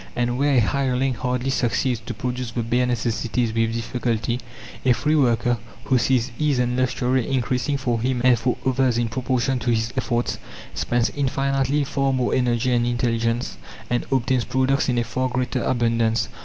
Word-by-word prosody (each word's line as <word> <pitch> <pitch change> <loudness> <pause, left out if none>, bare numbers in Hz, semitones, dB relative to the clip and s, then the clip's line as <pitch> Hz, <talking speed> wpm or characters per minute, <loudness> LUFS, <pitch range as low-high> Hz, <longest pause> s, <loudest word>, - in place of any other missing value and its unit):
And 120 +1 0
where 140 0 +3
a - - +6
hireling 130 +2 +1
hardly 125 +2 -2
succeeds 125 -1 0
to - - -4
produce 125 -1 -3
the 115 +1 -3
bare 120 +2 +1
necessities 120 -1 -1
with 115 0 0
difficulty, 115 0 -1 0.4
a 125 - +5
free 150 +5 0
worker, 120 -3 +2 0.2
who 125 +4 +2
sees 130 0 +1
ease 150 -3 +2
and 125 0 +1
luxury 130 0 0
increasing 130 +2 0
for 120 -4 -1
him 125 +1 0
and 125 -2 +5
for 125 +2 0
others 130 -2 +2
in 120 -1 0
proportion 130 +1 0
to 120 - -2
his 115 0 0
efforts, 120 -2 -1 0.3
spends 115 +11 0
infinitely 135 0 0
far 135 0 0
more 130 -1 0
energy 125 0 +1
and 120 0 +2
intelligence, 115 - -1 0.3
and 120 - 0
obtains 130 -1 +1
products 130 +2 +1
in 125 - +1
a 120 - +2
far 130 +2 -2
greater 125 0 -1
abundance. 115 -2 +1
125 Hz, 170 wpm, -23 LUFS, 120-130 Hz, 0.4 s, a